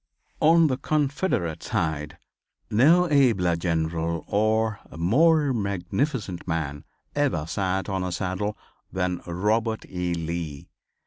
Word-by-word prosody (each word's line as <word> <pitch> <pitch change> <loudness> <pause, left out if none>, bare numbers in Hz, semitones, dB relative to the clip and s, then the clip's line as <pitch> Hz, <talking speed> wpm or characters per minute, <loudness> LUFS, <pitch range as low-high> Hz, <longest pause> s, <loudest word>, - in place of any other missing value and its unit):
On 165 +1 +5
the 130 -4 +1
Confederate 145 - -1
side 80 -8 -2 0.5
no 160 +11 +5
abler 110 - +3
general 85 -1 -1
or 110 0 +1 0.2
more 145 - +3
magnificent 100 - -2
man, 75 -4 -3 0.3
ever 140 - +1
sat 95 +3 -1
on 95 -1 -2
a 90 - -2
saddle 95 +3 -2 0.3
than 90 -1 -1
Robert 110 +6 0
E. 90 -1 -2
Lee. 80 -3 -5
95 Hz, 110 wpm, -25 LUFS, 85-125 Hz, 0.5 s, On